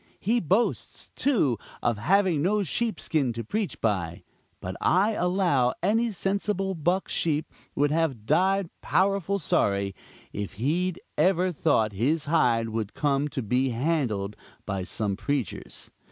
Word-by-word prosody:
He 230 +5 +1
boasts, 195 +7 -1
too, 170 - +2 0.2
of 115 -3 +1
having 180 - +3
no 205 +5 +2
sheepskin 160 - -1
to 115 +1 -4
preach 210 - -3
by; 90 -6 -1 0.4
but - - -5
I 195 +5 +3
allow 180 - +1
any 225 +4 +2
sensible 195 0 -1
buck 175 +3 0
sheep 155 -2 0 0.3
would 145 0 +2
have 150 -9 0
died 185 - +2
powerful 195 0 +1
sorry, 100 - +1 0.4
if 100 0 -4
he'd 165 - -1 0.2
ever 185 +2 +3
thought 115 -10 +1
his 145 +10 0
hide 120 -8 +2
would 110 -2 -4
come 145 0 +1
to 135 -3 -4
be 125 +5 +1
handled 120 -7 -1 0.3
by 95 -2 -3
some 100 -1 -2
preachers. 135 +1 -4
150 Hz, 135 wpm, -26 LUFS, 115-190 Hz, 0.4 s, having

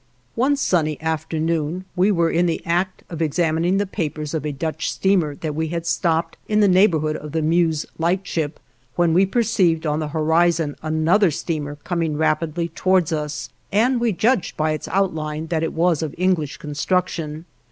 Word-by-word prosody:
One 265 +5 +2
sunny 160 - 0
afternoon, 160 +2 -2
we 185 +2 +3
were 170 -3 +2
in 175 +1 +2
the 165 - -2
act 180 +2 -1
of 165 -2 -6
examining 165 +3 +1
the 205 - +1
papers 155 -5 -4
of 155 -2 -2
a - - -1
Dutch 155 +3 -3
steamer 180 -7 +1
that 155 +1 -4
we 160 +2 -1
had 170 +1 -4
stopped 165 -1 0
in 210 0 +2
the 205 - +5
neighborhood 170 -5 +3
of 150 0 -9
the 160 -1 0
Meuse 160 -1 +2
Lightship, 165 -3 -1 0.4
when 170 -2 +2
we 190 +3 +4
perceived 195 -7 +1
on 150 0 0
the 155 - -2
horizon 160 0 +1
another 160 +6 +3
steamer 150 -1 -3
coming 160 0 -2
rapidly 160 +2 0
towards 185 0 +1
us, 150 -1 -3 0.2
and 235 +5 +3
we 235 -2 +2
judged 215 +2 +1
by 155 0 +1
its 155 - -4
outline 160 -5 -1
that 165 -2 0
it 165 - -1
was 165 -1 +2
of 155 -3 -4
English 175 -6 0
construction. 155 +1 -2
165 Hz, 175 wpm, -21 LUFS, 155-180 Hz, 0.4 s, the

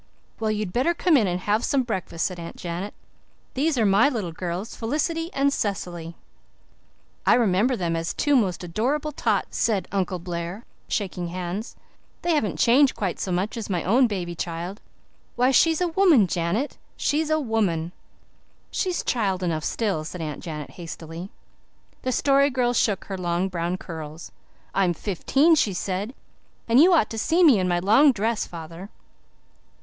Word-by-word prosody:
"Well, 220 -1 0
you'd 210 -4 -2
better 275 +8 +2
come 345 -1 +3
in 225 -8 +4
and 180 0 -2
have 210 +4 +1
some 275 -2 +2
breakfast," 185 -7 -3
said 180 -2 -3
Aunt 170 0 -7
Janet. 175 +4 -5 0.6
"These 290 +2 +1
are 225 - +3
my 205 +8 +5
little 215 - -3
girls 180 +5 -5
Felicity 320 +7 -1
and 275 0 +1
Cecily." 175 -7 -3 1.1
"I - - +5
remember 230 +2 +2
them 170 -5 -1
as 165 +1 -2
two 290 -1 +1
most 190 -7 +1
adorable 260 - -1
tots," - - -1
said 205 -6 +1
Uncle 190 -2 -1
Blair, 175 +4 -5 0.2
shaking 180 -4 -2
hands. 180 +5 -5 0.5
"They 345 - +2
haven't 260 -10 0
changed 265 +3 +4
quite 190 -5 -2
so 190 - -2
much 185 +7 -1
as 225 -3 -5
my 180 -4 -1
own 245 +7 +4
baby 180 -5 -3
child. 170 +4 -5 0.5
Why, 250 +2 +3
she's 325 +4 +4
a 360 - +2
woman, 335 - +5
Janet 180 - -2 0.2
she's 305 +1 0
a 310 0 +2
woman." 200 - 0 0.8
"She's 365 -2 -1
child 195 -6 0
enough 160 -3 -1
still," 200 -7 -1
said 175 +3 -7
Aunt 155 -3 -5
Janet 150 -4 -6
hastily. 165 +1 -8 0.7
The 255 - -1
Story 275 +2 +3
Girl 245 -2 +1
shook 210 -4 +1
her 195 -2 -5
long 175 +1 0
brown 175 0 -2
curls. 160 -3 -8 0.4
"I'm 185 -3 +2
fifteen," 270 - +2
she 220 -10 +2
said. 195 +6 -3 0.5
"And 235 +2 +5
you 350 +5 +7
ought 325 -11 +3
to 225 - -3
see 335 +10 +3
me 275 - +7
in 185 - +1
my 175 -1 +1
long 220 +11 +5
dress, 225 -1 -1
father." 170 +3 -9
200 Hz, 165 wpm, -24 LUFS, 175-255 Hz, 1.1 s, you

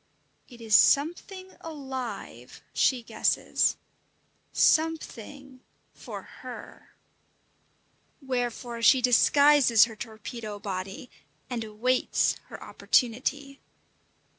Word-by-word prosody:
It 240 -3 -14
is 220 -2 -4
something 370 +6 +2
alive, 265 -6 -7
she 250 -3 +1
guesses - - 0 0.7
something 280 -4 0 0.3
for - - -9 0.2
her! - - -11 1.2
Wherefore 245 -3 -4
she 260 +3 +6
disguises 255 -1 +5
her 225 -1 -10
torpedo 215 0 -8
body, 195 +3 -6 0.4
and 235 -2 -2
awaits 225 +4 0
her - - -10
opportunity. 275 +3 -1
250 Hz, 80 wpm, -27 LUFS, 230-280 Hz, 1.2 s, she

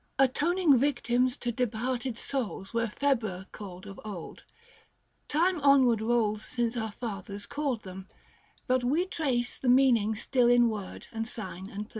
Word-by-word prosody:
Atoning 290 +3 +3
victims 250 -2 +1
to 240 - -2
departed 245 +1 -2
souls 235 -8 -4
Were 230 0 +1
Februa 220 -7 -1
called 185 -2 -9
of 195 -1 -9
old. 200 -6 -8 0.8
Time 340 +2 +1
onward 265 -5 +5
rolls 220 -2 +1
Since 235 0 -1
so 230 -3 -2
our 220 - -5
fathers 200 -3 -6
called 275 -7 -2
them; 190 0 -9 0.6
but 255 0 +1
we 300 +9 +2
trace 260 -9 -1
The 255 - 0
meaning 245 -4 +4
still 245 +3 +2
in 240 -1 +5
word 210 -4 -6
and 225 0 -3
sign 190 -4 -7
and 205 0 -5
place. - - -22
240 Hz, 155 wpm, -29 LUFS, 215-260 Hz, 0.8 s, onward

